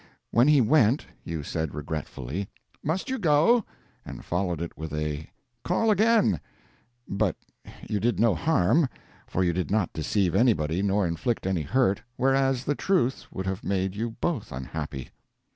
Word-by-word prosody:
When 120 +4 +5
he 150 -3 +6
went, 125 +1 +3 0.2
you 80 -3 -4
said 80 0 -3
regretfully, 75 +3 -4 0.3
"Must 160 +5 -1
you 260 0 -2
go?" 170 +7 +4 0.4
and - - -9
followed 90 -2 -1
it 85 0 -5
with 80 0 -6
a 75 0 -3 0.3
"Call 215 +5 +2
again"; 215 - +3 0.7
but 100 -1 0 0.5
you 105 - -1
did 120 +4 0
no 115 -1 +4
harm, 140 - +2 0.4
for 95 - 0
you 85 -1 +2
did 90 +1 -2
not 100 -3 +1
deceive 85 +3 0
anybody 90 -8 +2
nor 100 0 +2
inflict 85 +8 -1
any 95 -3 0
hurt, 100 - +1
whereas 135 -1 +2
the 145 - 0
truth 145 -6 0
would 95 - -4
have 95 +2 -3
made 95 -1 -1
you 115 +3 -2
both 150 -12 -2
unhappy. 65 +1 -5
100 Hz, 155 wpm, -27 LUFS, 85-135 Hz, 0.7 s, he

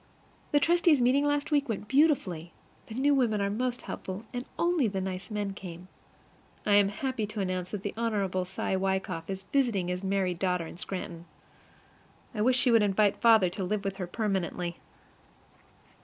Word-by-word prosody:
The 290 - +5
trustees' 340 -2 +4
meeting 260 +4 +3
last 290 +1 0
week 290 -3 +2
went 210 -1 -3
beautifully. 235 - +2 0.4
The 220 - -8
new 280 +3 +3
women 235 -6 +2
are 200 0 0
most 245 +3 -2
helpful, 190 +4 -6
and 245 0 -3
only 340 -7 +2
the 195 -2 -2
nice 185 +1 -4
men 205 -2 -2
came. 180 -2 -9 0.8
I 205 - +3
am 200 -1 +6
happy 230 0 -2
to 215 0 -6
announce 185 -2 -2
that 200 -1 -5
the 205 - -3
Hon. 205 -5 0
Cy 190 +1 -2
Wykoff 190 -3 -2
is 190 0 -4
visiting 230 -10 +2
his 180 +1 -3
married 190 -2 0
daughter 180 -3 0
in 160 - -10
Scranton. 175 -2 -6 1.1
I 210 - -2
wish 250 +3 +4
she 250 0 +4
would 230 -1 +6
invite 205 0 +2
father 225 -5 +6
to 190 +1 -4
live 205 +2 -1
with 195 -1 -2
her 185 -3 -4
permanently. 180 -4 -2
205 Hz, 175 wpm, -29 LUFS, 185-245 Hz, 1.1 s, am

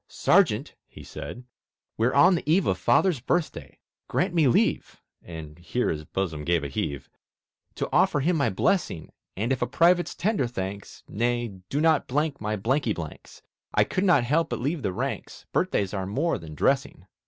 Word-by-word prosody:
"Sergeant," - - +2
he - - -13
said, 125 - -8 0.5
"we're 115 +3 +2
on 180 +7 +6
the 165 -4 -2
eve 185 +3 +3
Of - - 0
Father's 180 -8 +3
birthday; 160 +7 -2 0.3
grant 180 0 0
me 160 -5 +4
leave" 120 - +1 0.2
(And 80 -2 -9
here 105 +8 -1
his 75 -1 -3
bosom 80 -4 -3
gave 85 0 +1
a 70 - -4
heave) 70 0 -3 0.7
"To - - -2
offer 145 - +3
him 170 +5 +2
my 140 -6 +2
blessing; 95 - -1 0.3
And, 115 +6 0
if 130 - -4
a 120 - +1
Private's 175 +5 +3
tender 185 - 0
thanks 100 -3 -6
Nay, 120 +2 -1 0.2
do 145 - -1
not 160 -1 +3
blank 145 +2 -1
my 105 0 -1
blanky 120 +3 0
blanks! 80 -3 -9 0.3
I - - +5
could 185 - -2
not 175 -10 +4
help 150 +7 +1
but - - -3
leave 145 +5 -2
the 95 - -1
ranks; - - -5
Birthdays 100 -1 0
are 95 -2 -3
more 145 - 0
than 80 -2 -10
dressing." - - 0
120 Hz, 175 wpm, -26 LUFS, 95-160 Hz, 0.7 s, on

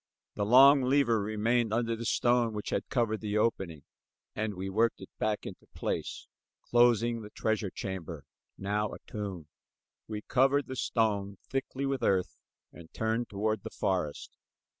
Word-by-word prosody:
The 100 - -2
long 135 +4 +8
lever 125 -4 +3
remained 110 +2 +1
under 115 0 0
the 115 0 -4
stone 120 -2 +2
which 105 -1 -4
had - - -2
covered 115 -4 0
the 105 -1 -1
opening, 95 -9 -1 0.5
and 110 -1 -2
we 95 +1 -4
worked 110 +4 +1
it - - -11
back 105 -1 -1
into - - -9
place - - -3 0.4
closing 120 -1 +3
the 105 - -9
treasure 110 -2 -1
chamber, 85 -7 -6 0.3
now 105 +1 -1
a - - -9
tomb. 100 -6 -5 0.6
We 105 -1 -5
covered 135 +2 +3
the 130 - -6
stone 100 -5 0
thickly 135 +1 -2
with 135 -2 -1
earth 95 -5 +1 0.3
and 85 -2 -13
turned 115 +1 -1
toward 110 +2 -1
the - - -6
forest. 90 -7 -2
110 Hz, 155 wpm, -30 LUFS, 100-120 Hz, 0.6 s, long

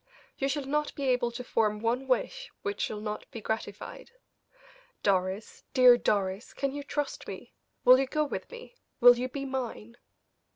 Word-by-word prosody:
You 275 - -1
shall 285 0 -2
not 300 +2 -1
be 280 - -4
able 245 -1 +2
to 235 +1 -6
form 215 -3 +1
one 240 +4 -1
wish - - -1
which 405 0 -3
shall 210 - -2
not 210 0 -5
be 235 - -7
gratified. 220 +1 -5 0.9
Doris 190 +1 0
dear 250 -2 +8
Doris 200 -2 -1
can 275 0 -1
you 290 - -4
trust 290 0 -4
me? - - -8 0.3
Will 255 +1 +9
you 270 - +1
go 305 +3 +1
with - - -5
me 485 0 -11 0.2
will 245 -1 +8
you 255 +1 -2
be 275 +1 -5
mine?" 240 -3 -5
250 Hz, 170 wpm, -29 LUFS, 225-280 Hz, 0.9 s, Will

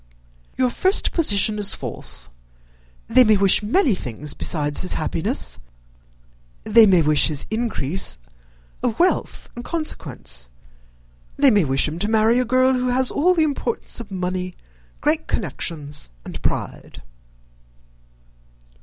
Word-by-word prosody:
"Your 255 -1 +2
first 375 - +1
position 210 - +3
is 205 -1 +3
false. - - -3 0.8
They 250 +3 +6
may 215 -3 +4
wish 195 0 +4
many 250 - +2
things 145 - -4
besides 150 -3 0
his 185 - 0
happiness: - - -2 1.0
they 220 0 +6
may 180 -4 +4
wish 150 -1 +3
his 150 -3 -2
increase 190 - -1 0.6
of 235 -3 -1
wealth 360 +2 0
and 240 - -7
consequence; 145 - -4 0.9
they 275 -2 +5
may 205 -6 +3
wish 135 +1 +2
him 155 +3 -5
to 210 - 0
marry 220 +2 +3
a 255 - +1
girl 255 +2 +3
who 250 0 -1
has 255 +1 +1
all 360 +5 +2
the 325 - +3
importance 275 -7 -2
of 230 -3 -9
money, 185 -1 -4 0.5
great - - 0
connections, 145 - -4 0.2
and - - -8
pride." - - -4
210 Hz, 130 wpm, -21 LUFS, 165-255 Hz, 1.0 s, They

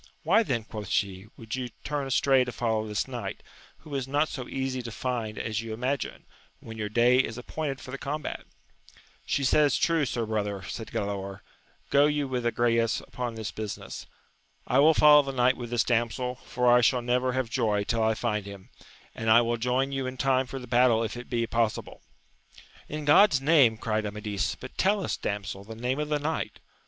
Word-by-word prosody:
Why 190 +8 +4
then, 125 - -1
quoth 105 -2 -7
she, 95 +1 -1
would 110 -1 -8
you 130 -2 -3
turn 145 -2 -2
astray 135 0 +3
to 125 - -5
follow 110 -2 -1
this 105 +3 -2
knight, 120 -7 -6 0.4
who 155 -2 -11
is 135 -2 -2
not 145 +3 +1
so 125 -4 -6
easy 130 -1 -2
to 120 -1 -7
find 115 -3 -3
as 110 0 -2
you 115 -1 -5
imagine, 130 +4 -3 0.3
when 115 - -10
your 105 -1 -3
day 120 +3 +4
is 115 -3 0
appointed 135 +2 -4
for 130 +2 -10
the 135 - -6
combat 150 +1 -4
1 - - -21 0.8
She 140 - 0
says 145 +1 +4
true, 165 -3 +2
sir 115 -2 -2
brother, 105 -3 -2
said 110 +4 -6
Galaor: 100 -1 -4 0.5
go 145 +1 +5
you 150 -1 0
with 125 -2 -3
Agrayes 115 -1 +1
upon 120 -2 -5
this 110 -1 -4
business; 110 -2 -6 0.6
I 130 - +2
will 155 +3 +6
follow 150 0 +8
the 135 -1 -4
knight 130 0 +3
with 120 -2 -7
this 120 -1 +2
damsel, 120 +1 0
for 125 0 -2
I 120 0 +6
shall 125 +1 +3
never 125 +1 +1
have 130 -3 -2
joy 110 -5 +1
tiU 115 +2 -1
I 110 0 +2
find 105 -3 -2
him, 100 -2 -10 0.4
and 115 0 -3
I 115 +2 +7
will 120 0 0
join 125 +4 0
you 135 -1 -2
in 130 0 -6
time 130 -1 +2
for 135 - -6
the 125 - -7
battle 120 -1 +3
if 115 - -4
it 120 +1 -9
be 115 -2 0
possible. 115 -1 -2 0.9
In 150 0 -5
God's 150 +1 +6
name! 135 -6 +4
cried 110 -1 -1
Amadis, 105 -1 -3
but 130 - -11
tell 200 +1 +2
us, - - -1
damsel, 100 -1 -4
the 110 +2 -9
name 125 +4 -2
of 150 0 -2
the 150 - +2
knight. 155 +2 -3
120 Hz, 205 wpm, -27 LUFS, 110-135 Hz, 0.9 s, follow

